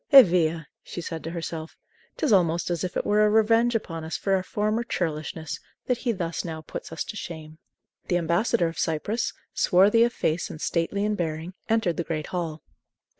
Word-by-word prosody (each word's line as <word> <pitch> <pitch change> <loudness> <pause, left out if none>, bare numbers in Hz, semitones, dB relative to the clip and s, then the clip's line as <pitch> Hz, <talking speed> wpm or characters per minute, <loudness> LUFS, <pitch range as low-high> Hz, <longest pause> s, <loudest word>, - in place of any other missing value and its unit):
"Eh 275 -2 +12
via!" 165 -4 +1 0.2
she - - -7
said 165 -1 -5
to 165 - -4
herself, 165 -1 -5 0.4
"'t - - 0
is 270 - +4
almost 175 -2 +3
as 170 -2 -1
if 180 - -2
it - - -1
were 210 +1 +4
a 210 - +5
revenge 225 +2 +4
upon 165 -7 -3
us 160 - -3
for 195 - 0
our 190 - +3
former 215 +4 -1
churlishness, 160 -5 -3 0.3
that 250 -2 0
he 245 - 0
thus 170 -5 -3
now 160 -2 -5
puts 155 - -8
us 165 - -2
to - - -7
shame." 160 -4 -7 0.5
The 175 - +2
ambassador 175 +3 +2
of 165 - -6
Cyprus, 190 +8 0 0.2
swarthy 200 +5 +5
of 240 - +3
face 165 -5 -1
and 155 - -8
stately 170 +6 0
in 210 - +1
bearing, 165 -1 -3 0.2
entered 220 -6 +2
the 170 - 0
great 160 -2 -3
hall. 165 -4 -3
175 Hz, 200 wpm, -26 LUFS, 160-210 Hz, 0.5 s, Eh